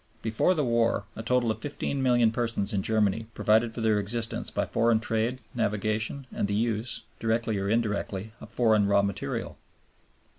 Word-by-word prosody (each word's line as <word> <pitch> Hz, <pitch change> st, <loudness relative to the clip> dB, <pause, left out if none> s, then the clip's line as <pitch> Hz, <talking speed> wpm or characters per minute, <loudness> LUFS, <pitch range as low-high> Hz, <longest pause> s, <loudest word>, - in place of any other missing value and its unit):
Before 115 Hz, +11 st, +2 dB
the 150 Hz, -, +1 dB
war 115 Hz, -4 st, +1 dB
a -, -, -5 dB
total 120 Hz, 0 st, +2 dB
of -, -, -5 dB
fifteen 140 Hz, -1 st, -3 dB
million 120 Hz, -3 st, +4 dB
persons 115 Hz, -3 st, -1 dB
in 100 Hz, -, +1 dB
Germany 110 Hz, +1 st, +1 dB
provided 110 Hz, +2 st, +3 dB
for 115 Hz, -, -5 dB
their 110 Hz, -2 st, +3 dB
existence 115 Hz, +3 st, -3 dB
by -, -, -1 dB
foreign 115 Hz, -1 st, +2 dB
trade, 115 Hz, +3 st, -1 dB, 0.2 s
navigation, 110 Hz, +3 st, -1 dB
and -, -, -1 dB
the 100 Hz, -, -1 dB
use, 115 Hz, +1 st, -1 dB, 0.2 s
directly 115 Hz, -2 st, 0 dB
or 100 Hz, 0 st, -1 dB
indirectly, 105 Hz, -2 st, -1 dB
of -, -, -11 dB
foreign 110 Hz, -4 st, +3 dB
raw 100 Hz, 0 st, +4 dB
material." 100 Hz, -1 st, -3 dB
110 Hz, 170 wpm, -27 LUFS, 105-120 Hz, 0.2 s, million